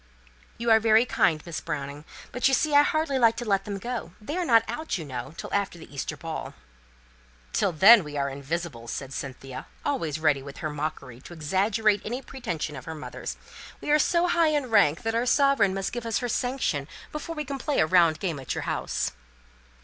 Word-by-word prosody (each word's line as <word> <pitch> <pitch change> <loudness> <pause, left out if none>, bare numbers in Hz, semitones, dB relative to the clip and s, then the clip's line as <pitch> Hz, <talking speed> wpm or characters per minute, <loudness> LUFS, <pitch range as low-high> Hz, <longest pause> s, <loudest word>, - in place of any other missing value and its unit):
"You 235 0 0
are 220 - +7
very 220 +1 +5
kind, 160 -9 +1
Miss 170 -2 -5
Browning, 145 -1 -5 0.3
but, 250 - +2
you 270 - +4
see, 305 +3 0
I 285 - +8
hardly 295 -2 +1
like 230 -2 +5
to 240 - -4
let 195 -2 +1
them 200 -1 -4
go 235 -5 -5
they 250 +9 -5
are 360 -1 0
not 230 -6 +5
out, 315 -8 -3
you 165 - -6
know, 130 +2 -6
till - - -7
after 200 -3 0
the 160 - -13
Easter 140 - -4
ball." - - -6 1.0
"Till 195 - +2
when 195 +6 +8
we 150 -1 -7
are 140 0 0
invisible," 140 -2 -4
said 135 +3 -5
Cynthia, 135 -1 -7 0.2
always 165 - -1
ready 150 -3 +2
with 140 0 -10
her 155 - -3
mockery 145 -4 -5
to 175 - -11
exaggerate 200 +6 +1
any 245 +5 -4
pretension 170 - -4
of 130 - -9
her 160 - -6
mother's. 150 - -6 0.4
"We - - -3
are 300 - +5
so 340 +3 +3
high 340 -2 +3
in 290 -5 -1
rank 170 -8 +4
that 225 0 -1
our 235 +2 0
sovereign 275 -9 +4
must 195 -1 -2
give 240 -1 -4
us 225 -3 +1
her 245 - -2
sanction 245 - -1 0.2
before 330 +2 -5
we 300 -1 -3
can 275 0 -5
play 290 +2 0
a - - +5
round 170 -2 +4
game 170 -7 -2
at 130 - -4
your - - -3
house." - - -2
195 Hz, 210 wpm, -26 LUFS, 150-250 Hz, 1.0 s, I